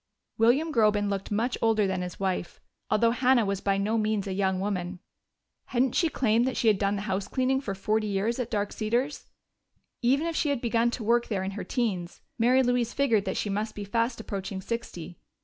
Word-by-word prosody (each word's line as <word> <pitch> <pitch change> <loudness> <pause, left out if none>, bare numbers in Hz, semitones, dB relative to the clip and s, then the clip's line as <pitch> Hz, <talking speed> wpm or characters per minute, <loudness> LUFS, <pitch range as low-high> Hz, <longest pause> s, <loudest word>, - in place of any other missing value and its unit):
William 275 +8 +3
Groben 210 -3 +3
looked 195 -1 -3
much 230 +4 -1
older 220 -2 +3
than 190 -1 -1
his 180 0 -6
wife, 190 -3 -2 0.3
although 230 +2 +3
Hannah 250 -1 +3
was 195 -1 -2
by 195 -1 +1
no 215 +3 0
means 215 -2 0
a 195 - -3
young 190 -1 0
woman. 185 -2 -2 0.7
Hadn't 250 0 +1
she 335 - +2
claimed 235 -3 +2
that 260 - -2
she 225 - +3
had 205 -3 +2
done 200 0 +1
the 200 - -4
house 195 -1 -2
cleaning 265 +1 +1
for 200 -7 -4
forty 215 +2 0
years 205 +5 -1
at 250 - -2
Dark 205 -1 -1
Cedars? 240 +7 -2 0.7
Even 270 +6 +2
if 335 -1 -2
she 300 - +1
had 280 -3 0
begun 235 0 +1
to 235 -1 -5
work 235 +2 +2
there 195 -4 -1
in 190 - -3
her 195 -1 -5
teens, 190 -6 -2 0.2
Mary 250 +3 +4
Louise 245 -1 +1
figured 230 -8 +2
that 190 - -2
she - - -1
must 210 +2 -2
be 205 - -5
fast 230 +4 -1
approaching 195 -2 -5
sixty. 180 -5 -6
215 Hz, 210 wpm, -27 LUFS, 195-240 Hz, 0.7 s, Mary